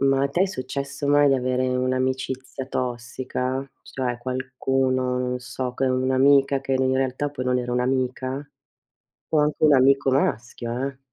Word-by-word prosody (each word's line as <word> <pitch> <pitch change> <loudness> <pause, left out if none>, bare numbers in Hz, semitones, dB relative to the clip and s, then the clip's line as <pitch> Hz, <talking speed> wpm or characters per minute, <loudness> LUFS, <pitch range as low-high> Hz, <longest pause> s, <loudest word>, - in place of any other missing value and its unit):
Ma 135 0 +3
a 140 - +2
te 175 +7 +1
è - - +3
successo 140 -3 -4
mai 145 0 +5
di 135 - +4
avere 130 0 0
un'amicizia 130 +1 -2
tossica? 130 +1 -3
Cioè 125 -2 -3
qualcuno, 130 0 -1
non 125 0 -1
so, 125 0 -5
che 135 - 0
è 130 - +2
un'amica 135 +2 +3
che 135 0 -3
in 130 0 +2
realtà 135 +2 -1
poi 130 -3 -5
non 125 0 +1
era 120 0 -3
un'amica? 130 +2 -1 0.8
O 155 - +3
anche 150 0 +2
un 150 -2 +6
amico 135 +1 +4
maschio, 120 -1 -1
eh! 135 - -11
130 Hz, 160 wpm, -24 LUFS, 125-135 Hz, 0.8 s, un